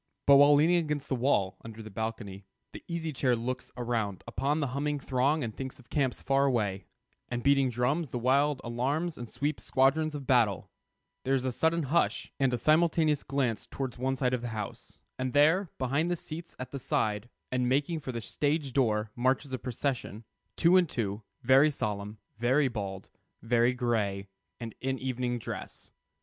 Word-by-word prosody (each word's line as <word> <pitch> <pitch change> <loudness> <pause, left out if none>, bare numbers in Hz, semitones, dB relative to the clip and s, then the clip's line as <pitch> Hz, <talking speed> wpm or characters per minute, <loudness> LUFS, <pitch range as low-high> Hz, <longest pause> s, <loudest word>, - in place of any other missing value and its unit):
But 140 0 +8
while 145 +1 +7
leaning 165 +5 +4
against 150 -4 -2
the 130 - +1
wall, 115 -7 +1
under 115 0 -9
the 110 - -10
balcony, 100 -2 -5 0.3
the - - -9
Easy 165 -2 -3
Chair 130 -2 +2
looks 125 +2 -4
around 115 -6 -2
upon 140 +6 -1
the 140 -4 -1
humming 145 +1 -1
throng 135 +3 +1
and 110 -3 -4
thinks 130 0 -6
of 125 -3 -19
camps 135 -4 0
far 135 0 +3
away, 105 -8 0 0.4
and 120 -1 -3
beating 140 -2 +4
drums 130 +6 0
and 120 -1 -4
wild 140 +2 +3
alarms 140 +8 -1
and 120 -2 -7
sweeping 145 +2 -2
squadrons 150 +4 +2
of 140 -2 -6
battle, 120 -7 +2 0.5
there 135 +1 +2
is 130 -1 -1
a 130 - 0
sudden 160 +6 +1
hush 150 +5 0
and 135 -2 +3
a 125 - 0
simultaneous 155 +1 +3
glance 130 -5 -1
towards 130 -4 -5
one 135 +1 0
side 125 -1 0
of 125 - 0
the 120 - -4
house, 110 -3 -6 0.2
and 130 -1 -2
there, 160 +6 +4
behind 140 +6 0
the 175 - +1
seats 165 0 -8
at 130 - -7
the 140 - -5
side, 105 -2 -1 0.2
and 125 -1 +1
making 145 +5 +1
for 135 - -5
the 115 -1 -4
stage 145 +2 -1
door, 110 -5 +1
marches 130 +3 0
a 130 - -2
procession, 125 -3 -3 0.3
two 175 +2 +5
and 180 -4 +3
two, 105 -2 -2 0.2
very 135 +4 +6
solemn, 105 -5 -4 0.2
very 130 +4 +3
bald, 100 -5 -5 0.4
very 120 +2 +3
gray, 105 -5 -1 0.3
and 115 -2 -6
in 135 0 -1
evening 125 -1 -2
dress. 115 - -8
130 Hz, 185 wpm, -29 LUFS, 115-145 Hz, 0.5 s, But